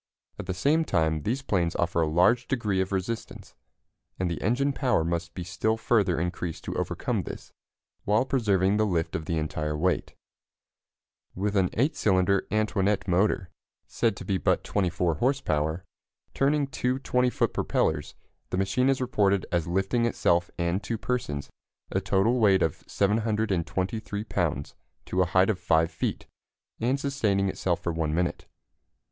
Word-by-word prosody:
At - - -6
the 95 - -1
same 150 - +2
time 80 - +1
these 125 - -2
planes 85 -8 0
offer 85 0 +1
a 80 - +2
large 90 +10 +3
degree 105 -8 0
of 95 - -3
resistance, 100 +4 -4 0.6
and 90 -2 -1
the 85 - -4
engine 135 +7 +1
power 125 - +1
must 85 +1 -3
be 90 - -4
still 90 +5 -1
further 105 -7 +2
increased 85 -1 -3
to - - -5
overcome - - -1
this, - - -9 0.5
while 105 +5 +2
preserving 105 -7 +2
the 110 - +3
lift 85 -4 -1
of 80 - -3
the 80 +1 -1
entire 75 -1 -2
weight. 90 +3 0 1.2
With 100 +2 -1
an 95 -3 +3
8 140 +7 +1
cylinder 95 -1 +2
Antoinette 105 -2 +1
motor, 95 0 +1 0.3
said - - 0
to - - -8
be 95 -1 0
but - - +1
24 90 -4 0
horse 135 - +1
power, 80 - -1 0.5
turning 145 +1 +2
two 130 -1 -1
20 125 -2 +1
foot - - 0
propellers, 75 -2 0 0.3
the - - -2
machine 95 +8 +2
is 135 -1 +1
reported 100 -6 +2
as 85 -2 0
lifting 95 +7 +1
itself 85 -6 +1
and 85 +3 0
two 115 +3 -3
persons 105 - -3 0.4
a 95 - 0
total 100 +6 +2
weight 95 -4 +4
of 80 - -2
723 105 -1 -1
pounds 80 -9 -2 0.3
to 95 - 0
a - - +4
height 95 +3 +4
of 95 - -4
5 80 0 +2
feet, - - -3 0.5
and 125 +4 +1
sustaining 110 -9 +1
itself 90 -2 -1
for 85 - -1
1 80 -2 -1
minute. 90 +1 -1
95 Hz, 160 wpm, -27 LUFS, 85-115 Hz, 1.2 s, weight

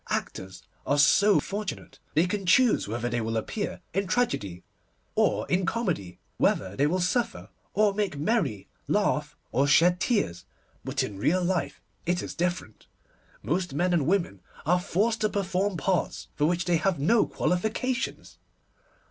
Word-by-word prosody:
Actors 95 0 -4 0.2
are 145 - +1
so 200 +8 +5
fortunate. 205 0 -5 0.2
They 160 +3 +4
can 195 0 -3
choose 245 - +4
whether 120 +3 -2
they 120 -1 -1
will 115 0 -2
appear 205 - -3
in 195 +2 0
tragedy 145 - -1 0.5
or - - +1
in 185 +1 +1
comedy, 180 - -2 0.2
whether 95 +1 +1
they 145 +5 +2
will 180 +5 0
suffer 230 +6 -1 0.3
or 210 0 +3
make 200 -7 -1
merry, 150 - 0 0.2
laugh - - 0
or 135 +5 +2
shed 175 +5 +5
tears. 90 - 0 0.4
But - - -1
in 100 -2 -6
real 180 - +2
life 175 -1 -1 0.2
it 175 0 0
is - - -6
different. 175 -10 -3 0.6
Most 175 -2 -1
men 180 +4 +1
and 155 -5 +2
women 170 - 0 0.2
are 180 +4 +3
forced 220 +6 0
to 215 - +2
perform 195 -1 -1
parts 180 +3 -1
for 150 - +1
which 175 +1 0
they 175 -2 +3
have 175 +2 0
no 215 +11 +3
qualifications. 220 +8 -2
180 Hz, 155 wpm, -27 LUFS, 145-200 Hz, 0.6 s, so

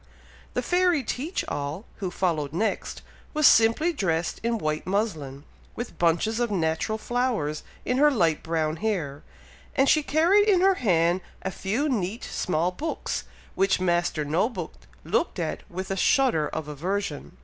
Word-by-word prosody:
The - - 0
fairy 355 -5 +2
Teach 290 - -3
all, 145 +8 -4
who 190 -3 -3
followed 160 -6 -1
next, 215 +6 -2 0.3
was 305 -1 +3
simply 230 +11 +5
dressed 170 - -1
in 230 0 0
white 155 -4 -2
muslin, 160 -9 -2 0.3
with 240 - -6
bunches 175 +7 +2
of 240 -1 +1
natural 170 +3 0
flowers 225 - -1 0.2
in 250 +2 +1
her 295 +1 +7
light 170 - +2
brown 160 -1 -1
hair, 160 -9 -2 0.5
and 270 - +4
she 305 - +5
carried 350 +9 +4
in 370 -3 +4
her 385 +1 +5
hand 175 -4 +3 0.2
a 190 - -2
few 220 +12 -1
neat 225 -3 -2
small 175 0 -1
books, 310 - -3 0.3
which 195 0 +2
Master 175 -4 +1
No 165 +10 +1
book 180 -9 -6 0.3
looked - - 0
at - - -2
with 185 +2 -5
a - - 0
shudder 195 - +3
of 155 0 -5
aversion. 150 - -4
190 Hz, 155 wpm, -26 LUFS, 160-245 Hz, 0.5 s, her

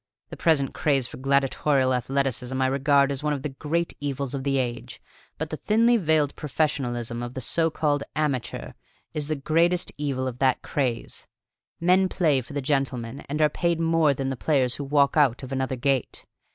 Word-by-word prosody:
The - - -5
present 150 -5 +1
craze 140 -4 +1
for - - -8
gladiatorial 135 0 +2
athleticism 130 0 -1
I 130 - +2
regard 140 +1 +3
as 140 -1 -2
one 150 0 0
of 140 -2 -4
the 150 - -2
great 160 +5 -2
evils 140 -2 -3
of 135 -1 -3
the 135 0 +1
age; 120 -2 -3 0.4
but - - -4
the - - -3
thinly 230 +3 +3
veiled 155 -8 +2
professionalism 120 -6 -2
of 120 +1 -6
the - - -3
so 165 +6 +1
called 150 -2 0
amateur 145 -6 -2 0.4
is 150 -1 -3
the 155 - -1
greatest 165 +5 +1
evil 135 -3 -1
of 125 -1 -6
that 130 -2 +2
craze. 125 -5 -2 0.5
Men 185 +2 +3
play 155 -9 +2
for 125 +3 -12
the 145 -1 -3
gentlemen 135 -2 -1
and 150 +2 +1
are - - +6
paid 170 +2 -1
more 165 -3 +3
than 135 0 -2
the - - -2
players 130 -2 +1
who 145 - -4
walk 140 +1 +2
out 140 -4 +3
of 130 - -7
another 130 0 -1
gate. 130 0 -1
140 Hz, 190 wpm, -25 LUFS, 130-150 Hz, 0.5 s, are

